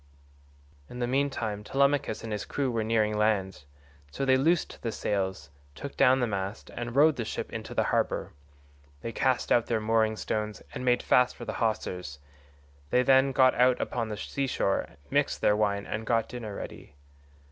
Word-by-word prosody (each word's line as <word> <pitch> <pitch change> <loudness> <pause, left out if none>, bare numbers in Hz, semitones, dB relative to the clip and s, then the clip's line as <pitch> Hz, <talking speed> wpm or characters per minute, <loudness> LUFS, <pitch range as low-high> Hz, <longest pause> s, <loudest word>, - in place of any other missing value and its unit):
In 125 - -9
the 125 - 0
mean 135 +3 +1
time 105 -5 -4
Telemachus 140 -2 +1
and 115 - -5
his 105 - -3
crew 135 -3 -2
were 115 -2 -1
nearing 110 -1 +1
land, 95 -7 0 0.4
so 135 - -3
they 130 -1 +5
loosed 160 +6 +1
the 115 - -2
sails, 95 -9 -2 0.2
took 140 - -7
down 130 +1 +5
the 125 - +2
mast, 100 -1 -4
and 120 0 -5
rowed 150 +2 +5
the 115 - -1
ship 110 - -5
into - - -6
the - - +3
harbour.136 70 0 -5
They 115 - -3
cast 130 +1 0
out 120 - +4
their 115 -2 +1
mooring 110 0 +2
stones 105 0 -3
and - - -5
made 125 -1 +2
fast 125 0 +3
the - - -5
hawsers; 90 -9 -2 0.7
they 125 - +3
then 135 +1 +5
got 130 -1 +5
out 125 0 +3
upon 115 -2 -2
the 105 - -4
sea 140 +6 -3
shore, 100 -6 0 0.2
mixed - - +1
their 105 - +4
wine, 100 -1 0
and 110 +1 -4
got 115 -2 +2
dinner 110 -4 -6
ready. 75 - -9
115 Hz, 180 wpm, -28 LUFS, 105-125 Hz, 0.7 s, they